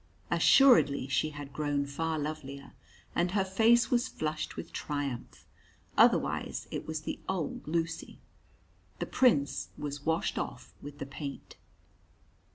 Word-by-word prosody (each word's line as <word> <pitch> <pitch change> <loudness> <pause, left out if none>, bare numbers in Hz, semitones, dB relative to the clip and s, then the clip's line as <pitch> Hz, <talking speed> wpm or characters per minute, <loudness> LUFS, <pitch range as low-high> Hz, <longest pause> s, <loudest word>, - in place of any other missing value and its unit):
Assuredly 230 - +6
she 140 +3 +1
had 145 -2 -9
grown 145 -1 0
far 160 +3 -2
lovelier, 145 -2 -5 0.4
and 175 +1 +1
her 195 -2 +2
face 225 +5 +4
was 245 0 +2
flushed 155 -6 -3
with - - -8
triumph; 145 -4 -4 0.5
otherwise - - +3
it - - -4
was 155 -1 -3
the - - -5
old 180 -7 -3
Lucy. 165 +1 -2 0.8
The - - -2
Prince 140 - +2
was 145 -1 -5
washed 160 +1 0
off - - -6
with 145 0 -9
the 140 - -5
paint. 140 +1 -7
150 Hz, 130 wpm, -30 LUFS, 140-170 Hz, 0.8 s, Assuredly